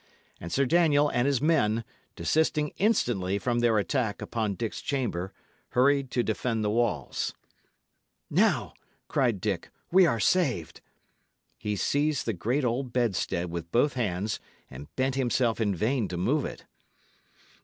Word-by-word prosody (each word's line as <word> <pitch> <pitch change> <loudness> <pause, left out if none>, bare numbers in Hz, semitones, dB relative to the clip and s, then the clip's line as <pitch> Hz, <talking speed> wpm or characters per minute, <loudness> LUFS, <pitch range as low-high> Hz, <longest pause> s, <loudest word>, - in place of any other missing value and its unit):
And 85 - -7
Sir 140 - +2
Daniel 150 -1 +4
and 120 0 +1
his 140 -1 +1
men, 115 -9 +2 0.3
desisting 150 - +1
instantly 120 - +1
from 120 +3 0
their 120 -2 +3
attack 110 +1 0
upon 110 -4 -2
Dick's 115 +2 -4
chamber, 105 -10 -2 0.4
hurried 140 +1 +3
to 125 -1 0
defend 110 0 -1
the 105 - +1
walls. 110 - -1 0.9
"Now," - - +2 0.3
cried 120 -7 +1
Dick, 95 -3 -2 0.2
"we 185 0 +6
are 115 -7 0
saved." 130 - +1 0.7
He 105 0 -3
seized 145 +7 0
the 115 - 0
great 125 - -1
old 125 +2 -1
bedstead 95 -7 -1
with 85 -1 -5
both 140 +5 +3
hands, 105 -3 -2 0.3
and 70 - -9
bent 130 0 +1
himself 120 -3 +1
in 100 -3 +1
vain 110 +4 0
to 90 - -5
move 90 - +1
it. - - -7
120 Hz, 145 wpm, -28 LUFS, 100-140 Hz, 0.9 s, we